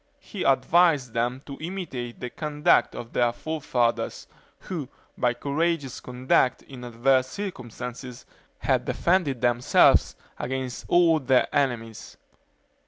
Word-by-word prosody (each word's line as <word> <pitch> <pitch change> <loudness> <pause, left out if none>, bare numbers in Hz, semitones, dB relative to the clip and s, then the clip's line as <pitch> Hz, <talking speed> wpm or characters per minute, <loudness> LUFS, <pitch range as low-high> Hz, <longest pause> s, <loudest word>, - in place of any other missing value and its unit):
He 200 - -9
advised 140 -1 +3
them 125 +3 -1
to 140 - -9
imitate 155 -9 -5
the 125 - -6
conduct 150 +2 +1
of 120 -1 -8
their 120 -1 +2
forefathers, 125 -4 -2 0.4
who, 160 -8 -5 0.3
by 125 -1 +1
courageous 145 +1 -1
conduct 125 0 +1
in 130 -2 -11
adverse 130 +2 +2
circumstances, 125 - -7 0.3
had - - 0
defended 170 -9 +1
themselves 120 0 +4 0.2
against 130 -1 -4
all 170 -2 +4
their 130 -2 +3
enemies. 120 -6 -2
130 Hz, 110 wpm, -25 LUFS, 120-155 Hz, 0.4 s, themselves